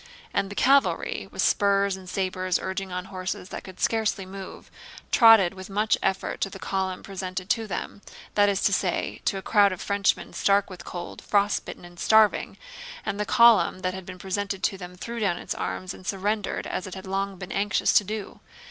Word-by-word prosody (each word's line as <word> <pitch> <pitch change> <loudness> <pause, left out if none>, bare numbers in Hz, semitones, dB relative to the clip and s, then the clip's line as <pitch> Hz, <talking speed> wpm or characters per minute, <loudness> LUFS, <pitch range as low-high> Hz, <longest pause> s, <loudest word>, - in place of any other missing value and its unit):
And 195 - 0
the 200 - -7
cavalry, 275 +5 +2
with - - -1
spurs 200 -1 +3
and 185 -1 -11
sabers 185 -1 -1
urging 190 0 -4
on 180 0 -4
horses 185 -1 -5
that - - -6
could 185 -1 -12
scarcely 220 -3 0
move, 190 0 -10 0.4
trotted 225 -7 +7
with 190 0 -10
much 210 +2 +2
effort 190 - -1
to 195 - 0
the 195 - -9
column 190 -1 -3
presented 185 -1 -4
to 225 -2 0
them—that 205 0 -2
is 195 -1 0
to 200 - +3
say, 185 -1 -1
to 195 - +1
a 190 - -6
crowd 205 -2 +4
of 185 - -5
Frenchmen 200 -1 0
stark 200 0 +2
with 175 -2 -10
cold, 175 -1 -7
frost 205 0 +1
bitten, - - -9
and 175 0 -14
starving—and 220 - +1
the 210 - 0
column 230 -5 +5
that 185 0 -1
had 190 -1 -8
been 185 -1 -8
presented 195 +1 -3
to - - +1
them 180 -1 -9
threw 235 +5 -6
down 195 -5 +1
its - - -4
arms 185 0 -4
and 185 - -13
surrendered 205 +2 -1
as 185 - -4
it 185 - -7
had 190 +1 -8
long 195 0 -2
been 190 0 -8
anxious 205 0 +1
to - - +6
do. 210 0 -6
195 Hz, 195 wpm, -26 LUFS, 185-205 Hz, 0.4 s, trotted